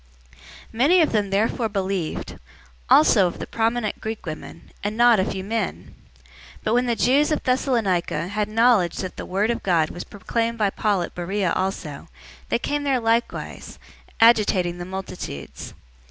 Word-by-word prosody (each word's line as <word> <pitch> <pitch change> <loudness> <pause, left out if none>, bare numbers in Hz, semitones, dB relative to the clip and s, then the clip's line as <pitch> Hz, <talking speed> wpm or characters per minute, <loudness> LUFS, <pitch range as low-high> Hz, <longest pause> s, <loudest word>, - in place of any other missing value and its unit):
017:012 - - -24 0.4
Many 290 +11 +4
of 315 - +2
them 205 -2 0
therefore 220 +3 0
believed; 190 -5 -3 0.5
also 180 +5 +6
of 175 - -6
the - - -5
prominent 225 -1 -1
Greek 220 -2 -5
women, 155 +1 -8
and 210 +2 -3
not 240 -2 +6
a 190 - +2
few 190 -2 -4
men. 215 -1 -3 0.7
017:013 - - -30
But 215 - 0
when 245 +1 +3
the 235 - +1
Jews 280 +7 +3
of 305 - 0
Thessalonica 230 -10 0
had 210 +1 -2
knowledge 220 -5 +3
that 185 -2 -5
the - - -7
word 200 +5 +1
of 235 - -3
God 165 -5 +1
was 175 - -6
proclaimed 230 +4 -3
by 210 -3 +1
Paul 200 -4 0
at - - -7
Beroea 185 +1 -1
also, 185 -6 -3 0.4
they - - +2
came 290 +4 -2
there 270 -3 +1
likewise, 230 0 -2 0.4
agitating 200 -6 +4
the 175 - -5
multitudes. 185 - -7
210 Hz, 170 wpm, -23 LUFS, 185-235 Hz, 0.7 s, also